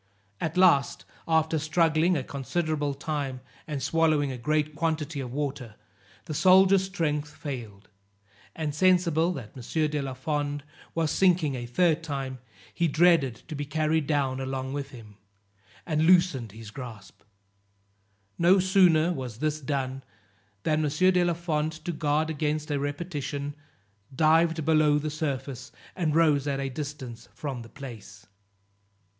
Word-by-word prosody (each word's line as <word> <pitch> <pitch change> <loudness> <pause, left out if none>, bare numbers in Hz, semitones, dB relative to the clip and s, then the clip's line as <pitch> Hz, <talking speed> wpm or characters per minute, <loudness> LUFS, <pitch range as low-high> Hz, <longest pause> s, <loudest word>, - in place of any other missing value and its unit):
At 160 +2 -3
last, 175 -7 +4 0.2
after 160 -1 +2
struggling 160 +2 +2
a 135 - -2
considerable 145 +2 -2
time, 140 -3 -3 0.3
and 145 -4 -4
swallowing 155 -2 +2
a 130 - -5
great 150 +4 0
quantity 155 -1 -2
of 125 -3 -5
water, 135 -5 -4 0.5
the - - -5
soldier's 190 +4 +5
strength 150 -6 -2
failed; 120 -9 -8 0.7
and 155 -2 -3
sensible 175 -1 +3
that 125 -9 -8
M. 130 - -8 0.3
de 150 -1 -1
la 135 -1 -5
Fond 145 +1 -2 0.3
was 165 -2 +1
sinking 175 -6 +3
a 120 -2 -5
third 165 +5 +2
time, 135 -5 -4 0.3
he 170 - +1
dreaded 155 -7 +3
to 160 - -6
be 145 0 -3
carried 155 +1 0
down 135 -4 0
along 130 0 -3
with 140 -1 -4
him, 110 -5 -13 0.7
and 155 -1 +1
loosened 170 - +4
his 110 -1 -10
grasp, 115 -6 -10 1.2
no 175 +3 +6
sooner 180 -3 +4
was 125 -7 -6
this 155 +3 -1
done, 135 -2 -2 0.6
than 155 0 +1
M. 150 - +1
de 180 +4 +3
la 175 -1 +1
Fond 160 -2 -1
to 160 +3 -5
guard 155 0 0
against 150 0 -2
a 145 - 0
repetition, 145 -1 -4 0.6
dived 160 +1 +3
below 155 -2 +4
the 150 +1 -2
surface, 135 -4 -4 0.2
and 160 -5 0
rose 150 -4 +3
at 140 -1 -1
a 135 0 -2
distance 135 -4 -7
from 135 -5 -5
the 115 - -11
place. 115 -8 -10
150 Hz, 145 wpm, -27 LUFS, 135-160 Hz, 1.2 s, no